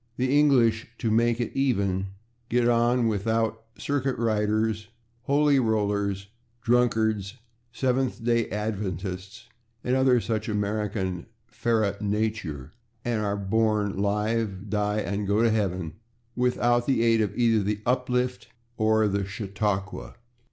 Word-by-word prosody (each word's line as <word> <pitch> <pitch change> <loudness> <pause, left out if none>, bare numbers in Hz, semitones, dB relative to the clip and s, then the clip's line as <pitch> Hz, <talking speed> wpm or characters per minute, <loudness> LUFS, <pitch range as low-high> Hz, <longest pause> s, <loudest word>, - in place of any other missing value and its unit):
The 130 +2 +1
English, 125 -7 +4
to 115 - -1
make 115 +1 +2
it 120 - -2
even, 100 -8 +1 0.4
get 120 0 +2
on 120 0 +3
without 110 +1 -1
/circuit 135 -2 -1
riders/, 110 -1 0 0.4
/holy 140 -2 +4
rollers/, 100 -3 0 0.4
/Dunkards/, 110 -4 +2 0.4
/Seventh 125 -1 -1
Day 115 -1 +1
Adventists/ 100 +1 -4 0.4
and 125 - +1
other 130 -2 +4
such 110 -1 -2
American 105 -3 -2 0.3
/ferae 110 -5 0
naturae/, 105 -9 -2 0.3
and 115 -3 0
are 100 -1 -1
born, 105 0 +1
live, 105 0 -1
die 105 0 0
and 100 +2 -3
go 105 +3 +2
to 115 - +4
heaven 95 -7 -1 0.4
without 120 -1 +1
the 130 -4 +2
aid 115 -1 +4
of 105 - -2
either 115 -3 +3
the 105 +1 -2
/uplift/ 125 0 0 0.3
or 110 -1 +3
the 100 0 0
/chautauqua 100 -1 -3
110 Hz, 125 wpm, -26 LUFS, 100-120 Hz, 0.4 s, English